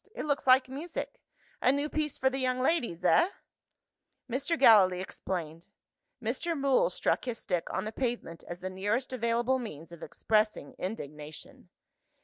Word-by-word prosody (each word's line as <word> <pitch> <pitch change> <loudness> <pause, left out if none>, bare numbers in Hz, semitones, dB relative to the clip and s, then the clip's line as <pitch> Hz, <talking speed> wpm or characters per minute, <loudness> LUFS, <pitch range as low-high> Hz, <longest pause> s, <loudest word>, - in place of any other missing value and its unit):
"It - - -4
looks 285 -2 -1
like 255 0 +6
music. 300 +6 -6 0.4
A 255 - +5
new 285 +2 0
piece 305 -1 -2
for 265 - +1
the 270 - -2
young 255 -1 0
ladies 240 - 0
eh?" 340 - +5 1.0
Mr. 280 +7 -1
Gallilee 195 -9 +6
explained. 170 -3 -5 0.5
Mr. 340 -2 -2
Mool 275 - +3
struck - - 0
his 245 -3 -3
stick 180 -5 -2
on 190 - -2
the 215 - -3
pavement, 235 -9 -3
as 175 +1 -7
the 185 +1 -4
nearest 210 +8 -1
available 240 +2 +1
means 165 - -8
of 170 - -11
expressing 215 -9 0
indignation. 150 -6 -7
235 Hz, 150 wpm, -30 LUFS, 185-270 Hz, 1.0 s, like